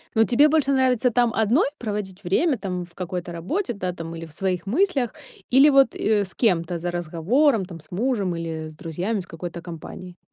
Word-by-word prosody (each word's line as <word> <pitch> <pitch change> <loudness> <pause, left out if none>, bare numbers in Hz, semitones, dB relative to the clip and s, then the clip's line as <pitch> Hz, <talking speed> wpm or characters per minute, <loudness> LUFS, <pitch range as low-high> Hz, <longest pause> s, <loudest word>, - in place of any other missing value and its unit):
Ну 225 - +6
тебе 255 +6 +5
больше 290 -3 +2
нравится 255 -2 +3
там 240 0 +3
одной 225 +8 +3
проводить 205 -4 -5
время, 260 - +2
там 185 -3 -4
в 170 -1 -23
какой-то 180 -1 -4
работе, 240 - -2
да, 185 -3 -3
там, 165 -1 -7
или 165 - -6
в 160 - -13
своих 185 0 -2
мыслях, 270 - +1 0.4
или, 275 +4 +7
вот, 275 -3 +4
э, 210 -1 +2
с 185 - -9
кем-то 175 -6 +1
за 175 +1 -3
разговором, 185 - +1
там 170 -3 -10
с 155 - -18
мужем 200 -3 0
или 160 -1 -4
с 155 - -14
друзьями 180 +6 -3
с 185 - -7
какой-то 170 +1 -7
компанией? 175 +2 -9
190 Hz, 200 wpm, -24 LUFS, 170-245 Hz, 0.4 s, или